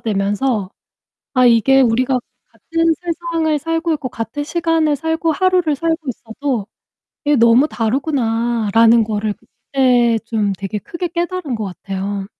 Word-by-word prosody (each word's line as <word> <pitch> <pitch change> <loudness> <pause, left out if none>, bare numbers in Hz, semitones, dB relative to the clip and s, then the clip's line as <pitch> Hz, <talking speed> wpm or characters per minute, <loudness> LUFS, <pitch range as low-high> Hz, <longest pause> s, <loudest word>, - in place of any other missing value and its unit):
되면서 205 +1 -1 0.6
'아 255 -2 +4
이게 245 +3 +5
우리가 255 +1 +2 0.3
같은 330 0 0
세상을 335 -2 -1
살고 330 +2 -1
있고 285 -4 -4
같은 235 +4 -5
시간을 325 -1 +1
살고 320 +2 -1
하루를 360 -3 +2
살고 330 +2 0
있어도 240 -1 -3 0.6
이게 295 0 +3
너무 235 +4 +5
다르구나.'라는 230 -3 +2
거를 210 0 -2
그때 245 0 +1
좀 210 -3 0
되게 195 +2 -4
크게 345 - -5
깨달은 345 -4 -3
것 220 - -3
같아요. 195 +1 -5
255 Hz, 285 characters per minute, -18 LUFS, 225-320 Hz, 0.6 s, 이게